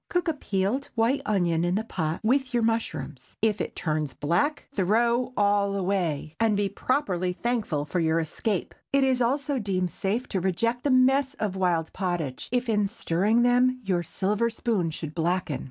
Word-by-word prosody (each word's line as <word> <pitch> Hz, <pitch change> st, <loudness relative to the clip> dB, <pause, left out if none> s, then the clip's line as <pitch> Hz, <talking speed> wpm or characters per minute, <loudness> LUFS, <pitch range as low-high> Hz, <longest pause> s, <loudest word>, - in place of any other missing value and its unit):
Cook 355 Hz, -1 st, 0 dB
a 325 Hz, -, +2 dB
peeled 210 Hz, 0 st, -1 dB
white 240 Hz, +5 st, +2 dB
onion 175 Hz, -5 st, +1 dB
in 175 Hz, +1 st, +1 dB
the 215 Hz, -, 0 dB
pot 160 Hz, -7 st, -3 dB
with 260 Hz, +2 st, +1 dB
your 235 Hz, -, +2 dB
mushrooms. 155 Hz, -, -3 dB
If 210 Hz, -3 st, +1 dB
it -, -, -4 dB
turn 155 Hz, -1 st, -1 dB
black, 175 Hz, -, 0 dB
throw 235 Hz, +5 st, +2 dB
all 200 Hz, -1 st, +2 dB
away, 180 Hz, -6 st, -1 dB
and 225 Hz, -2 st, +3 dB
be 200 Hz, -1 st, +1 dB
properly 190 Hz, -6 st, -1 dB
thankful 210 Hz, -9 st, -1 dB
for 175 Hz, +4 st, -2 dB
your 160 Hz, 0 st, +2 dB
escape. 175 Hz, +4 st, -2 dB, 0.2 s
It 275 Hz, 0 st, +3 dB
is 260 Hz, -1 st, +2 dB
also 275 Hz, +3 st, 0 dB
deemed 185 Hz, -4 st, -1 dB
safe 220 Hz, +6 st, -2 dB
to 190 Hz, -, -1 dB
reject 230 Hz, +7 st, 0 dB
the -, -, +3 dB
mess 265 Hz, +2 st, +3 dB
of 205 Hz, -3 st, -2 dB
wild 175 Hz, -4 st, 0 dB
pottage, 175 Hz, -8 st, -3 dB
if 245 Hz, 0 st, 0 dB
in 210 Hz, -3 st, +2 dB
stirring 210 Hz, +3 st, +1 dB
them, 250 Hz, +1 st, +3 dB
your 185 Hz, -4 st, 0 dB
silver 205 Hz, +7 st, 0 dB
spoon 220 Hz, -6 st, -1 dB
should 155 Hz, -1 st, -6 dB
blacken. 175 Hz, -1 st, -1 dB
200 Hz, 175 wpm, -26 LUFS, 175-240 Hz, 0.2 s, and